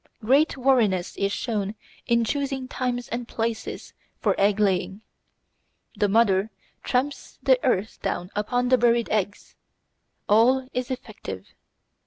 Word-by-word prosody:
Great 280 +5 +3
wariness 230 -9 +2
is 200 0 0
shown 210 -2 -2 0.3
in 235 0 +3
choosing 270 0 -2
times 245 -1 -3
and 235 0 -4
places 225 -1 -4 0.3
for - - +2
egg 200 +1 +3
laying. 195 0 0 0.9
The 205 - +1
mother 205 -1 +3 0.3
tramps 265 +3 -2
the - - +4
earth 200 +4 0
down 180 +3 -3
upon 245 +4 0
the 255 -1 +4
buried 235 -1 +3
eggs. 205 -1 -2 0.7
All 250 +5 +4
is 250 +1 -2
effective. 205 - -7
230 Hz, 125 wpm, -25 LUFS, 205-255 Hz, 0.9 s, the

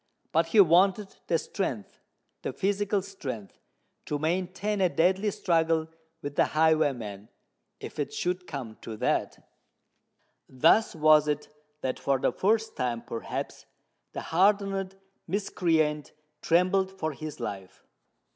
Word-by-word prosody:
But 165 +1 +2
he 210 - +3
wanted 190 +3 +4
the 165 - +3
strength—the 130 - -6
physical 200 0 0
strength 135 - -7 0.5
to 150 - -1
maintain 185 +6 -1
a 185 - +4
deadly 190 +5 +2
struggle 165 -4 +1 0.3
with 145 0 -5
the - - +4
highwayman, 135 -10 +1 0.5
if - - -9
it 145 - -2
should 180 0 -2
come 125 -7 -6
to 110 -1 -7
that! - - -1 1.0
Thus 160 - +4
was 155 -1 +5
it 150 0 -2 0.3
that 130 - -2
for 135 -1 +1
the 130 - +1
first 220 +3 +1
time, 120 -2 -2
perhaps, 115 - -5 0.5
the - - -4
hardened 195 +1 +1 0.3
miscreant 160 -5 0 0.3
trembled 185 +3 +2
for 160 -4 -2
his 155 +1 -7
life. 95 -3 -7
165 Hz, 120 wpm, -28 LUFS, 145-195 Hz, 1.0 s, was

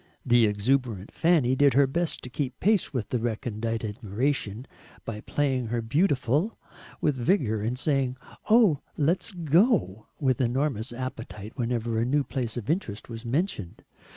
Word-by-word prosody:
The 120 -2 +5
exuberant 105 -1 0
Fanny 160 -7 +3
did 140 0 +4
her 140 0 +6
best 165 +5 -2
to 125 - -6
keep 130 -2 -3
pace 210 -2 +2
with 125 -6 -3
their 125 - 0
recondite 115 -1 -2
admiration 110 +2 -2 0.4
by 105 -2 -5
playing 130 -3 0
her 120 +1 -1
"beautiful," 145 - +1 0.4
with 150 - +2
vigour, 120 - +1
and 115 +4 -2
saying 135 -2 0 0.3
"Oh! 215 - +5 0.2
LET'S 165 +8 +1
go," 165 - +2
with 135 -1 +1
enormous 125 -1 0
appetite 120 -4 -6
whenever 115 -2 -1
a 115 - +1
new 140 +3 +2
place 125 -3 -4
of 115 -3 -5
interest 150 - -2
was 115 0 -7
mentioned. 130 - -2
125 Hz, 150 wpm, -27 LUFS, 115-145 Hz, 0.4 s, her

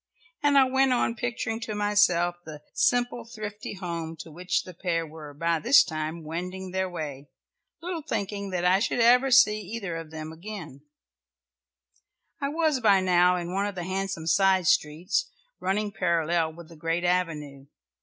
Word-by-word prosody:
And 290 -1 +4
I 270 - +8
went 265 0 +3
on 240 -1 +1
picturing 235 -1 -3
to 225 -2 -5
myself 205 -4 +2
the 150 -2 -10
simple 245 -1 +1
thrifty 215 -3 -7
home 170 -3 -5
to 160 - -12
which 180 +3 -1
the 185 - -10
pair 165 -1 -1
were 155 -1 -10
by 165 +3 0
this 260 - +6
time 160 0 -4
wending 180 +4 -5
their 190 0 -1
way, 145 -5 -6 0.5
little 350 -2 -3
thinking 200 -8 -3
that 180 -1 -2
I 185 +2 +5
should 235 - -1
ever 250 +3 +5
see 245 -5 +6
either 200 -3 -5
of 165 -1 -8
them 155 0 -7
again. 165 -5 -9 1.6
I 280 - 0
was 310 -2 +1
by 205 -5 +5
now 180 -1 +4
in 175 0 -4
one 200 +1 0
of 205 - -5
the 175 - -4
handsome 190 -2 -3
side 190 +1 +3
streets, 170 - +1 0.3
running 205 +2 -1
parallel 170 -3 0
with 170 0 -12
the 165 - -13
great 165 +2 -2
avenue. 155 -6 -1
180 Hz, 165 wpm, -27 LUFS, 165-215 Hz, 1.6 s, I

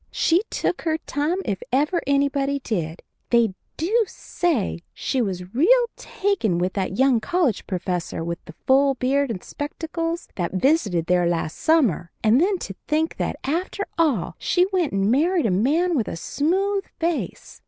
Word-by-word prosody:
She 335 +3 +2
took 360 - -1
her 320 -1 0
time 310 +2 -1
if 195 -2 -2
ever 295 +7 +2
anybody 280 0 +1
did. 175 - -3 0.3
They 235 -4 +3 0.2
do 430 +9 +2
say 320 - -1 0.2
she 265 - -1
was 185 -3 -4
real 475 - +5
taken 375 - -1
with 180 +2 0
that 190 -1 -2
young 265 -3 +4
college 320 - 0
professor 180 -3 -3
with 170 +1 -4
the 160 - -11
full 275 +1 +4
beard 270 +2 +1
and 200 -6 -4
spectacles 330 +3 -4
that 175 -2 -2
visited 200 - +2
there 180 0 +2
last 165 -2 -1
summer, 255 - +2
and 230 +5 +5
then 385 +2 +2
to 195 - -7
think 315 +2 0
that, - - -1
after 360 +7 -2
all, 240 - +1
she 360 0 +2
went 355 -5 +1
and 195 +2 +1
married 325 +5 +2
a 215 - +2
man 305 - +2
with 230 -7 0
a - - -4
smooth 385 - 0 0.2
face. 335 -1 -3
275 Hz, 165 wpm, -23 LUFS, -, 0.3 s, real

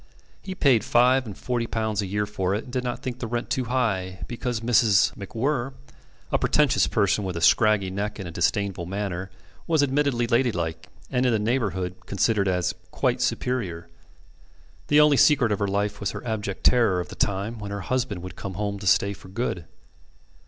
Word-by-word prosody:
He 190 - -6
paid 130 -9 +3
five 125 +1 +3
and 100 - -8
forty 120 -2 -2
pounds 110 -2 -1
a 100 - -3
year 105 +2 -1
for 100 -2 -1
it, 105 - -3
and 125 - -12
did 125 -1 -1
not 120 -1 -4
think 125 -1 -4
the 115 - -4
rent 120 +1 -3
too 130 - 0
high, 100 -7 -1
because 120 -1 -3
Mrs. 115 -4 +3
MacWhirr 120 +6 -2 0.6
(a - - +2
pretentious 150 -3 +3
person 105 -1 +1
with 90 -3 -3
a - - -4
scraggy 105 0 +4
neck 100 +2 -3
and 95 -4 -6
a - - -7
disdainful 90 +1 -1
manner) 95 -1 -4 0.4
was 160 -3 +3
admittedly 135 -3 +1
ladylike, 90 -9 0 0.2
and 125 -1 +1
in - - +3
the 115 - +2
neighbourhood 100 -6 -1
considered 100 0 +1
as 90 -2 0 0.2
"quite - - 0
superior." 95 -10 -2 1.0
The 150 - +5
only 150 -2 +6
secret 135 -7 +4
of 105 - 0
her 100 - 0
life 100 +1 -1
was 100 - -1
her - - -7
abject 105 -4 -4
terror 110 -7 +4
of 90 - -5
the - - -9
time 100 +4 -1
when 105 -1 -6
her 100 0 -4
husband 115 -4 -2
would 90 -2 -8
come 95 -2 -6
home 100 +1 -3
to 95 - -5
stay 100 +2 +3
for 95 - -13
good. 95 -4 -3
105 Hz, 195 wpm, -25 LUFS, 95-125 Hz, 1.0 s, only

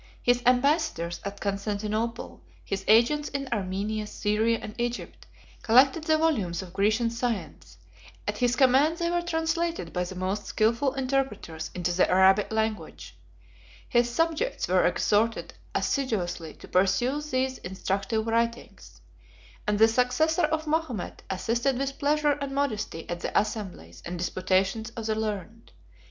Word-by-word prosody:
His 245 0 +3
ambassadors 255 - +2
at 200 0 -6
Constantinople, 210 - -3 0.2
his 195 0 -3
agents 240 +8 +4
in 275 -1 -4
Armenia, 210 +2 -2
Syria, 220 +3 +1
and 210 - -8
Egypt, 240 0 -4 0.3
collected 270 +7 +4
the 315 -1 +3
volumes 210 - 0
of 180 -2 -12
Grecian 215 +4 +2
science; 235 -2 -4 0.5
at - - -2
his 245 -1 +2
command 275 +5 +4
they 340 -1 -1
were 345 0 +1
translated 330 - -2
by 180 - 0
the 180 +1 -7
most 190 +3 -2
skilful 235 +5 +1
interpreters 260 -12 -2
into 175 -1 -1
the 180 +1 +2
Arabic 190 +3 +4
language: 220 - -3 0.7
his 240 0 +2
subjects 330 - 0
were - - +3
exhorted 225 +2 +1 0.2
assiduously 180 - -1
to - - -13
peruse 250 +11 +1
these 260 0 -1
instructive 195 +4 -2
writings; 230 - -2 0.7
and 210 0 +2
the 220 +1 +7
successor 250 +9 +2
of 315 +1 -1
Mahomet 305 - -2
assisted 235 +7 0
with 275 +1 -3
pleasure 295 0 +2
and 275 -1 -4
modesty 215 - -2
at 175 0 -4
the - - +1
assemblies 190 - -5
and 175 +1 -5
disputations 190 +5 0
of 225 - -4
the 220 - +1
learned. 215 - -5
225 Hz, 140 wpm, -27 LUFS, 195-275 Hz, 0.7 s, the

